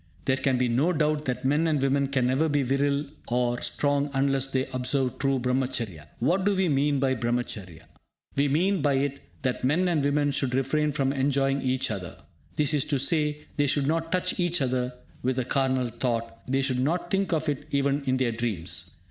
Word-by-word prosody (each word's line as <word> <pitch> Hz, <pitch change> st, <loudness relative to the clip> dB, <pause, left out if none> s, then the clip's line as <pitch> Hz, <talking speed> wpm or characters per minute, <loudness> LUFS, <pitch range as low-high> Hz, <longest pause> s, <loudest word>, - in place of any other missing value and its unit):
There 130 Hz, -1 st, +2 dB
can 135 Hz, -1 st, +1 dB
be 125 Hz, 0 st, +2 dB
no 135 Hz, +10 st, +2 dB
doubt 150 Hz, -1 st, 0 dB
that 125 Hz, 0 st, -3 dB
men 150 Hz, +5 st, +2 dB
and 155 Hz, -3 st, +1 dB
women 135 Hz, +1 st, +2 dB
can 135 Hz, -2 st, +1 dB
never 135 Hz, +6 st, +2 dB
be 145 Hz, -1 st, +2 dB
virile 140 Hz, +2 st, +1 dB, 0.2 s
or 120 Hz, 0 st, 0 dB
strong 145 Hz, 0 st, 0 dB
unless 135 Hz, 0 st, +2 dB
they 130 Hz, -1 st, 0 dB
observe 130 Hz, 0 st, 0 dB
true 135 Hz, -1 st, +1 dB
Brahmacharya. 125 Hz, -, -2 dB
What 180 Hz, +10 st, +1 dB
do 200 Hz, +1 st, +2 dB
we 190 Hz, -2 st, +1 dB
mean 140 Hz, 0 st, +2 dB
by 130 Hz, -1 st, +2 dB
Brahmacharya? 115 Hz, -8 st, -3 dB, 0.5 s
We 140 Hz, +1 st, +3 dB
mean 175 Hz, +6 st, +2 dB
by 140 Hz, -1 st, +2 dB
it 140 Hz, +1 st, -1 dB, 0.2 s
that 130 Hz, -2 st, -1 dB
men 160 Hz, +8 st, +2 dB
and 165 Hz, -5 st, +1 dB
women 145 Hz, 0 st, +2 dB
should 135 Hz, -2 st, -1 dB
refrain 150 Hz, +3 st, +1 dB
from 135 Hz, -2 st, 0 dB
enjoying 135 Hz, 0 st, +1 dB
each 130 Hz, -2 st, 0 dB
other. 95 Hz, -4 st, -6 dB, 0.4 s
That 150 Hz, 0 st, +2 dB
is 145 Hz, -3 st, +3 dB
to 145 Hz, -, 0 dB
say, 150 Hz, +1 st, +1 dB
they 145 Hz, -1 st, +2 dB
should 145 Hz, 0 st, +2 dB
not 165 Hz, +2 st, -1 dB
touch 185 Hz, 0 st, 0 dB
each 175 Hz, -1 st, +2 dB
other 125 Hz, -2 st, -1 dB, 0.3 s
with 130 Hz, +1 st, -1 dB
a 130 Hz, -, 0 dB
carnal 130 Hz, -2 st, +1 dB
thought, 115 Hz, -1 st, -3 dB
they 135 Hz, +1 st, +1 dB
should 130 Hz, -2 st, 0 dB
not 170 Hz, +6 st, -1 dB
think 195 Hz, 0 st, +1 dB
of 160 Hz, -1 st, 0 dB
it 145 Hz, 0 st, -2 dB
even 140 Hz, 0 st, +1 dB
in 130 Hz, 0 st, +1 dB
their 130 Hz, -2 st, +1 dB
dreams. 110 Hz, -7 st, -3 dB
135 Hz, 200 wpm, -26 LUFS, 125-150 Hz, 0.5 s, We